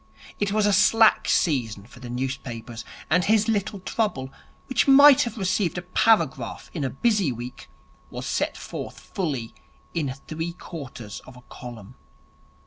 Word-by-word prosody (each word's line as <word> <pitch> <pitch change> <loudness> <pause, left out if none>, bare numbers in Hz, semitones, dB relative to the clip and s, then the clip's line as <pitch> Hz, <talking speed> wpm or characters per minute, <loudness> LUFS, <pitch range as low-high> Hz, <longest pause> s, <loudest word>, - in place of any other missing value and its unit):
It 205 -1 0
was 215 0 +2
a 205 - +3
slack 225 +2 +5
season 115 - +1
for 120 +1 -15
the 120 -1 -9
newspapers, 120 -2 -5 0.2
and 175 +4 +3
his 215 +2 +3
little 205 -2 -1
trouble, 180 - -2 0.3
which 260 - +1
might 280 0 +8
have 235 -1 -2
received 185 -3 0
a 175 - -4
paragraph 165 - +1
in 155 - -3
a 135 - 0
busy 200 - +1
week, 120 +1 -8 0.4
was - - -6
set - - -1
forth - - -7
fully 140 - -4 0.4
in 150 -6 -1 0.2
three 165 +2 -4
quarters 135 - -8
of 130 -1 -12
a - - -14
column. 120 -3 -10
160 Hz, 150 wpm, -25 LUFS, 125-205 Hz, 0.4 s, might